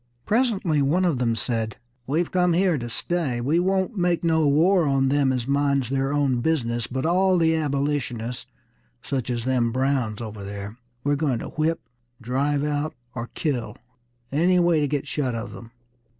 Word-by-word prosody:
Presently 205 Hz, -, +1 dB
one 165 Hz, +7 st, +2 dB
of 160 Hz, -8 st, +1 dB
them 115 Hz, -2 st, +1 dB
said: 110 Hz, -1 st, -2 dB, 0.3 s
"We've 160 Hz, +5 st, 0 dB
come 180 Hz, -1 st, +3 dB
here 180 Hz, 0 st, +3 dB
to 120 Hz, 0 st, -5 dB
stay. 145 Hz, -1 st, -2 dB
We 145 Hz, +8 st, +1 dB
won't 190 Hz, +4 st, 0 dB
make 175 Hz, -1 st, +1 dB
no 160 Hz, -2 st, +3 dB
war 165 Hz, +4 st, +4 dB
on 135 Hz, -1 st, +2 dB
them 140 Hz, -1 st, +2 dB
as 125 Hz, -2 st, -2 dB
minds 140 Hz, -2 st, +1 dB
their 135 Hz, 0 st, 0 dB
own 140 Hz, -4 st, +1 dB
business; 120 Hz, -6 st, 0 dB
but 130 Hz, +2 st, -3 dB
all 185 Hz, +2 st, +3 dB
the 160 Hz, -1 st, +3 dB
Abolitionists, 140 Hz, -5 st, -2 dB, 0.6 s
such 130 Hz, -3 st, -3 dB
as 120 Hz, -1 st, -2 dB
them 125 Hz, -3 st, +1 dB
Browns 130 Hz, -4 st, 0 dB
over 110 Hz, -3 st, -7 dB
there, 100 Hz, +1 st, -6 dB, 0.3 s
we're 145 Hz, 0 st, +2 dB
going 140 Hz, -4 st, 0 dB
to -, -, -6 dB
whip, 160 Hz, +2 st, -1 dB, 0.4 s
drive 140 Hz, +4 st, 0 dB
out, 150 Hz, +1 st, -1 dB, 0.2 s
or 120 Hz, -1 st, -5 dB
kill, 135 Hz, -7 st, -2 dB, 0.5 s
any 175 Hz, +6 st, +3 dB
way 175 Hz, -2 st, +3 dB
to 145 Hz, -, +1 dB
get 145 Hz, 0 st, -2 dB
shut 130 Hz, -5 st, -1 dB
of 115 Hz, -, -5 dB
them!" 115 Hz, -, -10 dB
140 Hz, 175 wpm, -24 LUFS, 125-165 Hz, 0.6 s, war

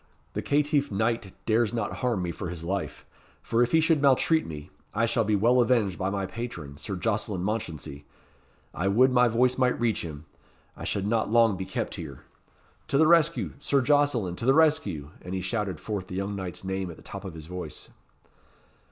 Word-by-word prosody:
The -, -, -2 dB
caitiff 145 Hz, -1 st, +1 dB
knight 110 Hz, -1 st, 0 dB
dares 115 Hz, 0 st, +2 dB
not 115 Hz, -3 st, -2 dB
harm 120 Hz, -7 st, 0 dB
me 85 Hz, -, -2 dB
for 85 Hz, +1 st, -5 dB
his 85 Hz, -2 st, -6 dB
life; 95 Hz, +3 st, -3 dB, 0.5 s
and 115 Hz, -, +4 dB
if 120 Hz, 0 st, +2 dB
he 160 Hz, -, +5 dB
should 160 Hz, -2 st, +3 dB
maltreat 145 Hz, +4 st, +3 dB
me, 75 Hz, -2 st, -8 dB, 0.2 s
I 115 Hz, -, +3 dB
shall 115 Hz, 0 st, +1 dB
be 105 Hz, 0 st, +1 dB
well 120 Hz, +5 st, +4 dB
avenged 115 Hz, -7 st, +2 dB
by 95 Hz, -, 0 dB
my 100 Hz, -1 st, -2 dB
patron, 95 Hz, -9 st, -7 dB
Sir 100 Hz, +5 st, -5 dB
Jocelyn 105 Hz, -1 st, -1 dB
Mounchensey. 80 Hz, -9 st, -4 dB, 0.7 s
I 90 Hz, -, -1 dB
would 125 Hz, +7 st, +4 dB
my 125 Hz, -1 st, +5 dB
voice 125 Hz, +3 st, +2 dB
might 125 Hz, -1 st, +2 dB
reach 115 Hz, -4 st, +1 dB
him 75 Hz, -2 st, -7 dB, 0.5 s
I -, -, -7 dB
should 100 Hz, -, -1 dB
not 110 Hz, 0 st, +1 dB
long 115 Hz, -2 st, +4 dB
be 95 Hz, 0 st, -4 dB
kept -, -, -3 dB
here. 70 Hz, -5 st, -9 dB, 0.7 s
To 140 Hz, -, +1 dB
the 160 Hz, -, +6 dB
rescue! 165 Hz, 0 st, +3 dB
Sir 140 Hz, -1 st, +2 dB
Jocelyn! 130 Hz, -9 st, +2 dB
to -, -, -4 dB
the 135 Hz, -, +6 dB
rescue!" 100 Hz, -, +2 dB
And 90 Hz, +1 st, -5 dB
he 95 Hz, -, -2 dB
shouted 95 Hz, -3 st, -2 dB
forth 100 Hz, -4 st, -4 dB
the 90 Hz, -, -7 dB
young 100 Hz, +2 st, -2 dB
knight's 95 Hz, -2 st, -6 dB
name 95 Hz, -1 st, -3 dB
at 85 Hz, -, -9 dB
the -, -, -16 dB
top -, -, -8 dB
of 95 Hz, -4 st, -7 dB
his 80 Hz, -2 st, -8 dB
voice. 90 Hz, +2 st, -7 dB
105 Hz, 200 wpm, -27 LUFS, 95-125 Hz, 0.7 s, the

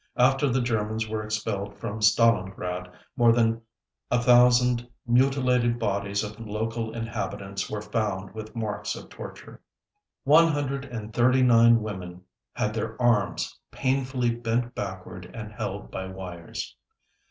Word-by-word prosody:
After 135 Hz, +3 st, +4 dB
the 130 Hz, +1 st, +1 dB
Germans 110 Hz, -1 st, -1 dB
were 110 Hz, 0 st, -2 dB
expelled 105 Hz, -2 st, -3 dB
from 110 Hz, -1 st, -5 dB
Stalingrad, 95 Hz, -5 st, +2 dB, 0.2 s
more 120 Hz, -1 st, +5 dB
than 115 Hz, -1 st, +2 dB, 0.5 s
a 125 Hz, -, +3 dB
thousand 125 Hz, 0 st, +5 dB, 0.2 s
mutilated 125 Hz, -1 st, +3 dB
bodies 100 Hz, -2 st, -1 dB
of 105 Hz, +1 st, -7 dB
local 110 Hz, +1 st, -3 dB
inhabitants 100 Hz, -4 st, -4 dB
were 105 Hz, -1 st, -4 dB
found 105 Hz, -3 st, -2 dB
with 110 Hz, +1 st, -8 dB
marks 110 Hz, -3 st, -3 dB
of -, -, -10 dB
torture. -, -, -10 dB, 0.6 s
One 160 Hz, +4 st, +6 dB
hundred 140 Hz, -3 st, -1 dB
and 110 Hz, -4 st, -7 dB
thirty 130 Hz, +3 st, +4 dB
nine 115 Hz, -2 st, +6 dB
women 90 Hz, -4 st, -7 dB, 0.3 s
had -, -, -1 dB
their -, -, -4 dB
arms 115 Hz, -6 st, +1 dB
painfully 130 Hz, -2 st, 0 dB
bent 120 Hz, +1 st, -1 dB
backward 95 Hz, -2 st, -6 dB
and 105 Hz, -2 st, -7 dB
held 100 Hz, -1 st, -5 dB
by 95 Hz, 0 st, -4 dB
wires. 90 Hz, -3 st, -7 dB
115 Hz, 130 wpm, -26 LUFS, 105-120 Hz, 0.6 s, One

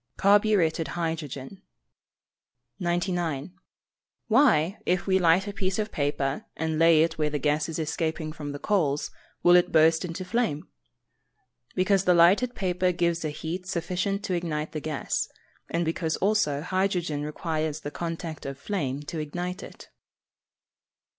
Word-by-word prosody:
_ -, -, -50 dB
Carburetted 200 Hz, -5 st, +3 dB
hydrogen. 160 Hz, 0 st, -4 dB, 1.2 s
99. 175 Hz, -4 st, -1 dB, 0.8 s
Why, 215 Hz, -, +4 dB
if 180 Hz, 0 st, 0 dB
we 190 Hz, -1 st, +3 dB
light 180 Hz, +3 st, +4 dB
a 205 Hz, -, -4 dB
piece 195 Hz, -1 st, -1 dB
of 215 Hz, 0 st, -2 dB
paper, 140 Hz, -1 st, -1 dB
and 160 Hz, 0 st, -1 dB
lay 165 Hz, -1 st, +6 dB
it 165 Hz, -, -2 dB
where 150 Hz, -1 st, +2 dB
the 150 Hz, -, -2 dB
gas 150 Hz, +2 st, 0 dB
is 160 Hz, -, -4 dB
escaping 160 Hz, 0 st, -2 dB
from 150 Hz, -2 st, -6 dB
the 145 Hz, -, -5 dB
coals, 150 Hz, -5 st, 0 dB, 0.3 s
will 175 Hz, 0 st, +7 dB
it 175 Hz, -, +4 dB
burst 160 Hz, +1 st, +4 dB
into 180 Hz, +1 st, -5 dB
flame? 180 Hz, -8 st, -1 dB, 1.1 s
Because 190 Hz, +1 st, +2 dB
the 180 Hz, -, +5 dB
lighted 195 Hz, +9 st, +5 dB
paper 180 Hz, -1 st, +1 dB
gives 170 Hz, -1 st, 0 dB
a 155 Hz, -, -1 dB
heat 170 Hz, +5 st, -5 dB
sufficient 185 Hz, +2 st, -2 dB
to 195 Hz, -, -2 dB
ignite 160 Hz, -3 st, -2 dB
the 155 Hz, -, -3 dB
gas; 150 Hz, -2 st, -2 dB, 0.4 s
and 170 Hz, +1 st, 0 dB
because 160 Hz, 0 st, -1 dB
also 190 Hz, -9 st, +1 dB
hydrogen 180 Hz, -5 st, 0 dB
requires 155 Hz, 0 st, -3 dB
the 145 Hz, -, -5 dB
contact 165 Hz, -3 st, -5 dB
of 140 Hz, -1 st, -5 dB
flame 145 Hz, -6 st, -3 dB
to 160 Hz, +2 st, -5 dB
ignite 175 Hz, +5 st, -4 dB
it. -, -, -11 dB
170 Hz, 145 wpm, -27 LUFS, 155-185 Hz, 1.2 s, will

